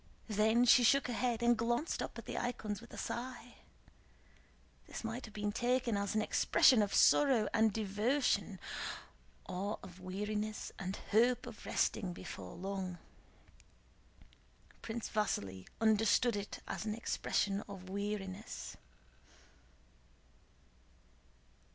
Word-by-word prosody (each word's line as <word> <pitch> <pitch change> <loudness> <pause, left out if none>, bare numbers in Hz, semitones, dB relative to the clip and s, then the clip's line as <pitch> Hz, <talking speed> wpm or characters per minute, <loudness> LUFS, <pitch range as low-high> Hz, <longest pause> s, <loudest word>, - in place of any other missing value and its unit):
Then 220 +3 +4
she 245 +1 +7
shook 275 +4 +5
her 245 - -2
head 240 -1 0
and 240 0 +5
glanced 240 +7 0
up - - -5
at - - -8
the - - -5
icons 215 -4 -3
with 235 - -14
a - - -9
sigh. 245 0 -5 1.3
This - - -7
might 225 +3 -4
have 220 - -13
been 205 0 -1
taken 245 +1 +1
as 200 +1 -1
an 215 - +2
expression 235 +2 +5
of 205 -1 0
sorrow 260 -7 +5
and 220 -1 +4
devotion, 210 0 0 0.9
or 200 +3 -3
of 185 -1 -11
weariness 210 +3 -3
and 190 0 -3 0.2
hope 240 +4 +4
of - - -10
resting 190 -5 0
before 95 - -8
long. 190 -1 -4 1.8
Prince 230 0 -4
Vasíli 95 - -2
understood 225 +1 +3
it 205 0 -5
as - - -3
an 215 -1 -2
expression 200 -3 0
of 190 -2 -8
weariness. 200 0 -4
215 Hz, 120 wpm, -35 LUFS, 200-235 Hz, 1.8 s, she